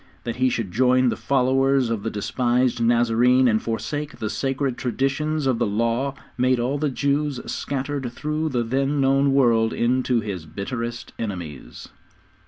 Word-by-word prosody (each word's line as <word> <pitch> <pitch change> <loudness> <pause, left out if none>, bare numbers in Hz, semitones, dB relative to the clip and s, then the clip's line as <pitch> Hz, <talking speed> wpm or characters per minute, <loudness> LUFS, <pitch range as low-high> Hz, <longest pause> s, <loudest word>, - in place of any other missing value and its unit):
That 115 - -4
he 130 0 +3
should 115 -6 -3
join 125 +3 +3
the - - -1
followers 135 -1 +2
of 110 -3 -1
the 115 - -2
despised 120 +3 0
Nazarene 120 +2 +4
and 110 -2 +2
forsake 145 +6 -4
the 110 -1 -3
sacred 135 -1 -1
traditions 140 +5 -1
of 130 -3 +1
the 120 - +1
Law 115 +6 0 0.2
made 130 0 +3
all 130 +4 -1
the 150 0 0
Jews 140 0 0
scattered 140 -2 -3
through 150 +5 -2
the 125 -4 0
then 135 +4 0
known 135 +1 +3
world 115 -4 +3
into 125 0 +1
his 95 -7 -5
bitterest 115 - -5
enemies. 90 - -6
125 Hz, 155 wpm, -23 LUFS, 115-135 Hz, 0.2 s, Nazarene